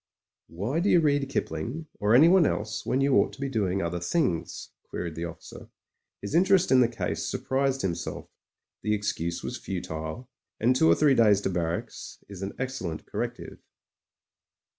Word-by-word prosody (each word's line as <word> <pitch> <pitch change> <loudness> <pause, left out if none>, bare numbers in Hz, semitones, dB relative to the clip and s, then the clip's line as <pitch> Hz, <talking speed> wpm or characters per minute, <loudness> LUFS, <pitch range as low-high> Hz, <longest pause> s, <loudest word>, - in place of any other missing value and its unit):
"Why 105 - -2
do 190 - +1
you 175 - +6
read 145 -3 +1
Kipling 120 - -3
or 105 +3 +3
anyone 170 +6 +6
else 105 +1 -3
when 130 - +1
you 135 -1 +3
ought - - +2
to - - -13
be 140 0 -2
doing 100 -6 0
other 85 +1 -2
things?" 85 - -1 0.2
queried 85 -2 -4
the 85 +2 -4
offi 85 -1 -9
cer. - - -11 0.6
His 100 - -5
interest 185 +2 +4
in 130 - +6
the 125 - +5
case 115 -1 -3
surprised 135 0 -1
himself; 85 -3 -3 0.5
the 105 0 +1
excuse 85 -5 -3
was - - -4
futile, 90 +3 -5 0.3
and 125 +3 +3
two 80 - +4
or 85 - +6
three 145 - +4
days 105 -5 +5
to 95 - -1
barracks 85 -1 -4
is 100 -2 -10
an 95 - -4
excellent 125 -12 -4
corrective. - - -5
105 Hz, 170 wpm, -27 LUFS, 85-135 Hz, 0.6 s, you